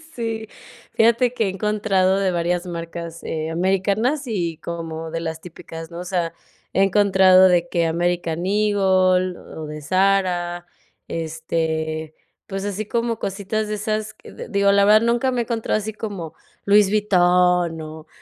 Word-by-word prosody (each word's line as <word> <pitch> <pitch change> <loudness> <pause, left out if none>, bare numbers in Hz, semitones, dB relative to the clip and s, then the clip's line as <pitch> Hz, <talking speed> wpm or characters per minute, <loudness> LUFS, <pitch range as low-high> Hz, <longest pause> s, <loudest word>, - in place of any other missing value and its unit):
Sí, 225 -2 -4 0.4
fíjate 235 +2 +3
que 225 -3 0
he 195 - 0
encontrado 195 -1 +1
de 190 -2 +1
varias 175 +1 -1
marcas, 170 -1 -6
eh, 160 0 -3
americanas 195 - 0
y 170 -7 -2
como 165 -1 -6
de 165 - -3
las 160 -1 -5
típicas, 165 -1 -10
¿no? 170 - -7
O 180 - -5
sea, 175 -2 -2 0.4
he 195 - +3
encontrado 190 -1 +5
de 175 -1 +2
que 170 -1 +1
American 170 0 -1
Eagle 190 -3 +2
o 155 - -9
de 150 0 -7
Zara, 180 -1 +1 0.4
este, 160 -1 -3 0.3
pues 195 0 -4
así 205 +1 -3
como 230 +1 -1
cositas 205 +2 -3
de 210 - -2
esas 215 +1 -3
que, - - -15
d - - -9
digo, 200 0 +3
la 200 0 +4
verdad 215 +2 +6
nunca 240 +3 +1
me 245 -1 0
he - - 0
encontrado 225 -1 -1
así 215 0 -4
como 195 -7 -6 0.3
Louis 200 -1 +5
Vuitton 180 -4 +3
o 155 0 -9
185 Hz, 160 wpm, -21 LUFS, 170-210 Hz, 0.4 s, verdad